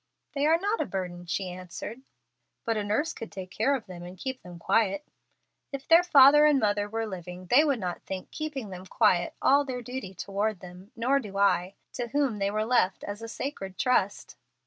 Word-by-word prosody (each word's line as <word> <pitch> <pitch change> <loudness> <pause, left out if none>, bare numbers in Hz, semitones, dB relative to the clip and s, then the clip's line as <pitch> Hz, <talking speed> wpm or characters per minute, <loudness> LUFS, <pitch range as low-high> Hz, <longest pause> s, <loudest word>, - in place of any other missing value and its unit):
"They 285 +1 +1
are 325 +1 +5
not 405 +5 -1
a - - -2
burden," 180 -2 -5
she 185 +1 -2
answered. 185 +6 -8 0.6
"But 225 - +1
a 210 - -1
nurse 215 +11 0
could 225 - -8
take 185 -1 -8
care 270 +6 +2
of 245 - -5
them 180 -3 -9
and 180 +1 -9
keep 260 +6 -5
them 180 -1 -11
quiet." 210 - +1 0.7
"If 275 -1 -6
their 330 +1 +8
father 295 -3 +7
and 295 -2 +4
mother 205 -2 +1
were 225 +1 -2
living 180 -2 -7
they 280 +5 +7
would 280 -6 +1
not 180 -3 -4
think 190 -1 -7
'keeping 280 -9 -5
them 185 0 -8
quiet' 185 -6 +2
all 280 +1 +5
their 255 -3 -5
duty 240 -6 -6
toward 200 +2 -2
them, 180 +4 -12
nor 255 +4 +2
do 205 -6 -7
I, 195 -1 +2 0.2
to 245 - -3
whom 260 -4 0
they 195 0 +1
were 215 +1 -1
left 230 -5 +2
as 205 +2 -6
a 230 - -6
sacred 195 -7 -5
trust." 210 -6 0
215 Hz, 205 wpm, -28 LUFS, 185-265 Hz, 0.7 s, their